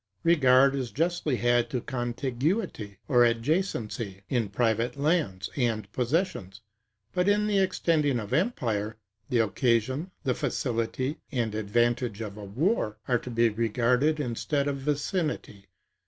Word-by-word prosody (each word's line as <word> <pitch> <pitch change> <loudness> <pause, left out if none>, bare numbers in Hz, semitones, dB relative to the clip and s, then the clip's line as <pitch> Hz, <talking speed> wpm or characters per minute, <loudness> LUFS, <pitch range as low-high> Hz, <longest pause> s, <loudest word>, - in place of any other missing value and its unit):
Regard 135 -5 +5
is 130 -3 -2
justly 165 -1 0
had 120 0 +2
to 125 - -1
contiguity, 125 - -2
or 125 -4 +3
adjacency, 115 - 0
in 120 -6 0
private 115 +4 0
lands 140 - 0
and 110 -6 -1
possessions; 125 - -1 0.5
but 180 +2 +2
in 210 +1 +3
the 205 -2 +2
extending 155 -8 +1
of 105 +1 -6
empire, 115 - 0 0.3
the 125 - +1
occasion, 120 - +1
the 130 -3 +1
facility, 125 +4 -2
and 120 -6 -1
advantage 120 +1 0
of 105 -3 -5
a 105 - -9
war, 110 - 0
are 125 -2 +2
to 125 - -8
be 115 -1 +3
regarded 120 +7 +1
instead 140 +2 -1
of 140 -1 -1
vicinity. 145 - -2
125 Hz, 130 wpm, -27 LUFS, 115-150 Hz, 0.5 s, Regard